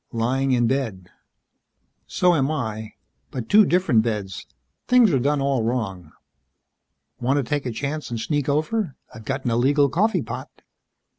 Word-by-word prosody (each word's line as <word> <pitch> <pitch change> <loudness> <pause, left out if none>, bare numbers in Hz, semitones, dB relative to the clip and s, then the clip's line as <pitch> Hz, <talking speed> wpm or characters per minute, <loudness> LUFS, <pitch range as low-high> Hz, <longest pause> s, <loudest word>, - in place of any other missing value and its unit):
"Lying 130 +4 0
in 120 -2 +3
bed." 115 -8 -2 1.0
"So 180 -1 +2
am 140 -4 +1
I. 110 -8 -4 0.4
But 125 -4 -6
two 210 -1 +6
different 175 -11 +3
beds. 105 -4 -4 0.4
Things 245 -7 +5
are 135 - +3
done 145 +3 +1
all 135 -2 +1
wrong." 105 -8 -3 1.1
"Want 130 +4 +1
to 140 - +1
take 145 +1 -2
a - - -2
chance 145 +5 -4
and 120 -1 -4
sneak 145 +4 -1
over? 155 - -1 0.2
I've 110 - -11
got 135 +2 -3
an 120 - +1
illegal 140 +5 +3
coffee 215 - +1
pot." - - -6
135 Hz, 155 wpm, -23 LUFS, 115-150 Hz, 1.1 s, two